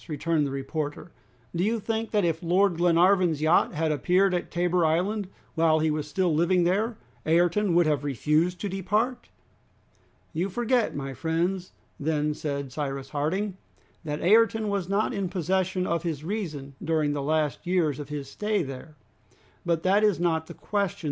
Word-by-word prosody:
returned 155 Hz, 0 st, 0 dB
the -, -, -5 dB
reporter; 145 Hz, +4 st, -4 dB, 0.4 s
"do 170 Hz, -, +1 dB
you 225 Hz, +3 st, +1 dB
think 225 Hz, +1 st, -2 dB
that 205 Hz, -4 st, +1 dB
if 165 Hz, -1 st, 0 dB
Lord 180 Hz, +1 st, +2 dB
Glenarvan's 175 Hz, -1 st, +3 dB
yacht 155 Hz, +3 st, +3 dB
had 160 Hz, 0 st, +1 dB
appeared 180 Hz, +7 st, +2 dB
at 175 Hz, -, -2 dB
Tabor 175 Hz, 0 st, +1 dB
Island, 185 Hz, +6 st, +1 dB, 0.3 s
while 160 Hz, -1 st, +3 dB
he 155 Hz, 0 st, +1 dB
was 150 Hz, -1 st, -2 dB
still 175 Hz, +2 st, +1 dB
living 175 Hz, +3 st, +3 dB
there, 210 Hz, +6 st, +1 dB, 0.3 s
Ayrton 175 Hz, +3 st, +3 dB
would 175 Hz, 0 st, +5 dB
have 150 Hz, -2 st, +1 dB
refused 150 Hz, +6 st, +1 dB
to 205 Hz, -, -1 dB
depart?" 210 Hz, +7 st, -1 dB, 1.0 s
"You 175 Hz, +5 st, -1 dB
forget, 240 Hz, +3 st, 0 dB
my 135 Hz, -1 st, -4 dB
friends," 175 Hz, +6 st, -2 dB, 0.3 s
then 150 Hz, 0 st, 0 dB
said 140 Hz, -3 st, -4 dB
Cyrus 135 Hz, -1 st, -4 dB
Harding, 185 Hz, +7 st, -1 dB, 0.5 s
"that 150 Hz, -2 st, -4 dB
Ayrton 220 Hz, +3 st, +4 dB
was 195 Hz, -3 st, -2 dB
not 205 Hz, +5 st, +1 dB
in 200 Hz, -4 st, -2 dB
possession 185 Hz, +1 st, 0 dB
of 170 Hz, -2 st, 0 dB
his 160 Hz, -4 st, -3 dB
reason 155 Hz, -8 st, -4 dB
during 155 Hz, -2 st, +1 dB
the 145 Hz, -, -2 dB
last 155 Hz, +1 st, -1 dB
years 165 Hz, -6 st, +1 dB
of 145 Hz, -1 st, -7 dB
his 145 Hz, -2 st, -5 dB
stay 210 Hz, +5 st, -1 dB
there. 135 Hz, +2 st, -8 dB, 0.7 s
But 170 Hz, -2 st, 0 dB
that 200 Hz, +3 st, +3 dB
is 210 Hz, -5 st, +3 dB
not 160 Hz, -2 st, 0 dB
the -, -, -9 dB
question. 200 Hz, -1 st, -2 dB
170 Hz, 170 wpm, -26 LUFS, 150-195 Hz, 1.0 s, would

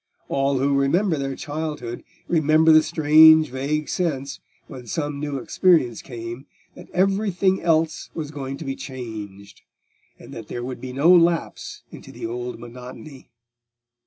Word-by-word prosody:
All 135 Hz, 0 st, +1 dB
who 140 Hz, +2 st, +1 dB
remember 170 Hz, +6 st, +2 dB
their 135 Hz, -2 st, -3 dB
childhood 150 Hz, -6 st, -5 dB, 0.2 s
remember 160 Hz, 0 st, +4 dB
the 155 Hz, 0 st, +7 dB
strange 155 Hz, -1 st, +6 dB
vague 145 Hz, +4 st, -2 dB
sense, 140 Hz, -7 st, -2 dB, 0.3 s
when 125 Hz, -4 st, -11 dB
some 145 Hz, +3 st, -3 dB
new 145 Hz, -1 st, -3 dB
experience 135 Hz, -, +2 dB
came, 120 Hz, +2 st, -8 dB, 0.3 s
that -, -, -14 dB
everything 195 Hz, 0 st, +1 dB
else 160 Hz, -1 st, 0 dB
was 150 Hz, -3 st, -5 dB
going 135 Hz, -2 st, -6 dB
to 160 Hz, -, -8 dB
be 135 Hz, 0 st, -3 dB
changed, 105 Hz, -8 st, -9 dB, 0.6 s
and -, -, -13 dB
that 115 Hz, -2 st, -9 dB
there 120 Hz, -, -5 dB
would 125 Hz, 0 st, -6 dB
be 130 Hz, -, -6 dB
no 145 Hz, +7 st, +4 dB
lapse 170 Hz, -1 st, 0 dB
into -, -, -12 dB
the -, -, -7 dB
old 120 Hz, +2 st, -5 dB
monotony. 125 Hz, +4 st, -11 dB
140 Hz, 145 wpm, -23 LUFS, 125-160 Hz, 0.6 s, the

